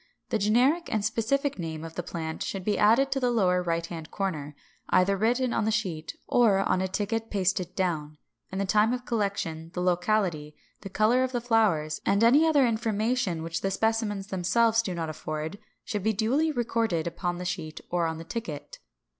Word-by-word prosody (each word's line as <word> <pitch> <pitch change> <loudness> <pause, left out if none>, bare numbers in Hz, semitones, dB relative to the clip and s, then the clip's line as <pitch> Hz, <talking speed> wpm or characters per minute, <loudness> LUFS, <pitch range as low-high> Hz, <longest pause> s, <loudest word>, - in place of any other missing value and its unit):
The 220 - 0
generic 250 - +2
and 215 -2 0
specific 245 +4 0
name 160 -2 -4
of 165 0 -8
the 175 - -3
plant 160 -2 -5
should 195 -2 -3
be 210 +2 +1
added 235 +6 +4
to 270 - +1
the 250 -2 +1
lower 185 -6 +2
right 170 -1 -1
hand 165 -2 -7
corner, 155 -8 -3 0.3
either 190 +2 +4
written 240 +5 +1
on 210 - +1
the - - +2
sheet, 185 -8 -2
or 230 -5 +4
on 195 -1 +1
a 190 - 0
ticket 215 +4 -2
pasted 185 -2 -1
down; 155 -5 -2 0.3
and 190 - -3
the 200 - 0
time 215 +4 +3
of 250 0 -4
collection, 195 -8 -2
the - - -2
locality, 180 -4 0 0.2
the 195 - -8
color 220 +6 +3
of 260 0 -2
the 245 - +1
flowers, 210 -11 +1
and 200 +3 +2
any 280 +8 +6
other 290 -4 +4
information 220 -5 0
which 165 0 -3
the 195 - 0
specimens 210 -1 -1
themselves 225 +5 +2
do 185 -6 -4
not 165 -1 -3
afford, 155 +3 -5 0.3
should 210 - -3
be 220 +3 +1
duly 265 +10 +1
recorded 230 - 0
upon 175 +1 -3
the 180 - -6
sheet 160 -3 -4
or 170 -2 +1
the 165 - -7
ticket. 190 -6 -6
200 Hz, 190 wpm, -27 LUFS, 170-230 Hz, 0.3 s, any